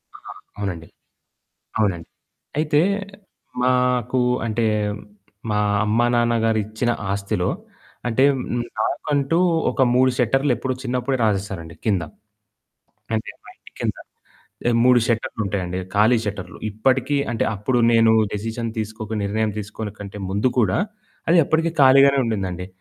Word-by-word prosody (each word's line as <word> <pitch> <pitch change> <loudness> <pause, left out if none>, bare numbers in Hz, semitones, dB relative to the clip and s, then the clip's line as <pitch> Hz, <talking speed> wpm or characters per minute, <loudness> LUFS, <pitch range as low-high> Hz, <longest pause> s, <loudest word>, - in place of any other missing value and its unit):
ఆ! - - -12 0.4
అవునండి. 90 -5 -4 0.9
అవునండి. 95 -6 0 0.5
అయితే 150 -1 +3 0.8
మాకు 125 0 +2 0.3
అంటే, 115 0 0 0.9
మా 105 - +1 0.3
అమ్మా 115 +3 +2
నాన్న 120 0 +2
గారు 110 -1 +2
ఇచ్చిన 110 +3 -1 0.2
ఆస్తిలో, 100 -2 -1 0.6
అంటే 120 +3 +2 0.6
నాకంటూ 145 +6 0 0.3
ఒక 135 - -1
3 130 +1 +5
షట్టర్లెప్పుడో 130 +1 +1
చిన్నప్పుడే 125 +1 -1
రాసేసారండి 95 -6 -2
కింద. 100 -6 +1 1.1
అంటే 110 - -2
మా - - -14
ఇంటి - - -18
కింద. - - -1 0.9
3 125 -1 +6
షట్టర్లుంటాయండి. 100 -5 -2 0.2
ఖాళీ 110 +4 +5
షట్టర్లు. 95 -3 -5
ఇప్పటికి 130 +6 +1
అంటే 115 - 0
అప్పుడు 120 +5 0
నేను 115 -1 +5 0.2
డెసిషన్ 115 +2 -3
తీసుకోక 110 0 -4
నిర్ణయం 110 +2 0
తీసుకోనె 105 0 -6
కంటే 105 0 -8
ముందు 105 +6 +1
కూడా 100 -6 +3 0.5
అది 170 +1 +5
అప్పటికి 165 +2 +1
ఖాళీగానే 135 +1 +6
ఉండిందండి. 95 -5 -3
110 Hz, 115 wpm, -22 LUFS, 100-125 Hz, 1.1 s, 3